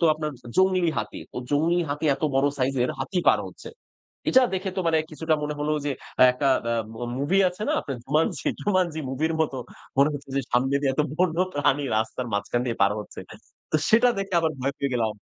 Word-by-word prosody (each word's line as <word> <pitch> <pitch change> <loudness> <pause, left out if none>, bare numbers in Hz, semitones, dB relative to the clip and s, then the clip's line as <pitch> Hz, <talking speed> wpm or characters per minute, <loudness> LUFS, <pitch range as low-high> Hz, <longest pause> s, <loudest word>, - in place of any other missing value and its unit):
তো - - +3
আপনার 155 0 -3 0.3
জংলি 185 -2 +3
হাতি, - - -4 0.2
ও - - -8
জংলি 160 +4 +2
হাতি 145 +2 -3
এত 135 - -13
বড় 135 +1 +3
সাইজের 130 -1 +1
হাতি 180 +7 -2
পার - - +5
হচ্ছে। - - -11 0.6
এটা 260 - +6
দেখে 190 +1 -2
তো - - +1
মানে 160 -1 +3
কিছুটা 160 +1 0
মনে 150 0 -2
হলো 150 +1 0
যে, - - 0 0.4
একটা 135 +2 0 0.2
অ্যা 115 0 0 0.2
মা 115 - -8 0.2
মুভি 150 +8 +2
আছে 180 +3 -8
না - - +2
আপনার 135 -2 -5
'Jumanji?' 150 +5 0
'Jumanji' 180 -6 0
মুভির 155 +5 0
মত 155 -3 +1 0.5
মনে 140 +2 +6
হচ্ছে 140 -1 -8
যে - - +3
সামনে 130 +3 +2
দিয়ে 140 -2 +1
এত 150 - +1 0.2
বন্য 175 -3 +1 0.2
প্রাণী 145 0 +2
রাস্তার 110 +3 -2
মাঝখান 100 +4 -1
দিয়ে 115 - -2
পার 100 +1 +4
হচ্ছে। 105 - -9 0.5
তো - - +5
সেটা 235 +3 +6
দেখে 195 -1 -3
আবার 160 -1 0
ভয় 140 +2 0
পেয়ে 140 -1 -1
গেলাম। 110 -3 0
150 Hz, 205 wpm, -25 LUFS, 135-170 Hz, 0.6 s, এটা